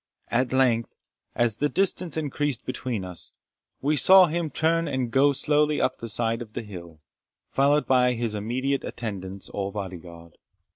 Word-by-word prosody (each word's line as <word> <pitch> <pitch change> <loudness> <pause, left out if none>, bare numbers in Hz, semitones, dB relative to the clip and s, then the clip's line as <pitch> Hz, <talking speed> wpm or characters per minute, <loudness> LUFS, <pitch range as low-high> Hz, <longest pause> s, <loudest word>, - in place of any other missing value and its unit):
At 125 +1 +1
length, 125 -3 +1 0.4
as 120 -2 +2
the 145 +4 +1
distance 180 0 0
increased 145 -4 -2
between 125 -6 -3
us, 90 -2 -4 0.5
we 150 +2 +2
saw 190 +4 +8
him 170 -1 -2
turn 165 +3 +1
and 130 -4 -2
go 140 +3 +4
slowly 150 +2 +1
up - - 0
the 115 - -6
side 115 +1 0
of 110 -2 -9
the - - -4
hill, 85 -6 -11 0.5
followed 145 +2 +3
by 125 -1 +3
his 115 -2 -2
immediate 130 +6 -2
attendants 100 -4 -6
or 100 -1 -3
bodyguard. 85 -4 -8
125 Hz, 155 wpm, -25 LUFS, 105-145 Hz, 0.5 s, saw